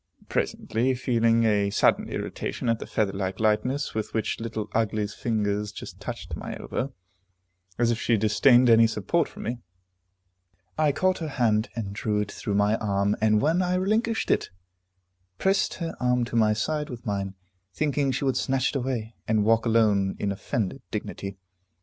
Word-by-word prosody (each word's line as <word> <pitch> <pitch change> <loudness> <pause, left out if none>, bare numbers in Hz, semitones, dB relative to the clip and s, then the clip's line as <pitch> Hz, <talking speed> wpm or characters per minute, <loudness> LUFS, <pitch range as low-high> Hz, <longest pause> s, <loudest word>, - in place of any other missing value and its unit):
Presently, 125 +4 0
feeling 115 -2 +2
a 105 -2 +2
sudden 100 - +2
irritation 120 - -3
at 115 -1 +1
the - - -7
feather 100 -3 0
like 95 -1 -3
lightness 125 +6 +1
with 110 +1 -4
which 110 - -1
Little 115 -2 -4
Ugly's 105 -2 0
fingers 105 -3 -1
just - - -9
touched - - -6
my - - -6
elbow, 135 - -3 0.9
as 120 -1 +3
if 115 - -1
she 115 - +2
disdained 120 +4 +5
any 115 -1 +7
support 110 - 0
from - - -9
me, 120 +2 -3 1.2
I 155 -2 +3
caught 185 +6 +1
her 160 - -3
hand 115 -5 +1
and 105 -4 -4
drew 105 0 -1
it 105 -1 -2
through 100 - -3
my 105 +2 +3
arm, 100 -1 +1
and 110 -1 +4
when 165 +5 +3
I 180 0 +1
relinquished 220 +5 +1
it, - - +1 0.9
pressed 195 +1 +1
her 165 -2 -4
arm 125 -1 +2
to 115 - -6
my 110 -2 +4
side 150 +7 -2
with 125 0 -8
mine, 100 -2 -2 0.4
thinking 145 0 0
she 140 - -2
would 130 - +1
snatch 135 -1 +1
it - - -1
away, 120 -4 -3
and 110 -2 +2
walk 115 +1 +3
alone 105 -4 +3
in 100 - -1
offended 100 +1 -3
dignity. 100 0 -5
115 Hz, 170 wpm, -26 LUFS, 105-130 Hz, 1.2 s, any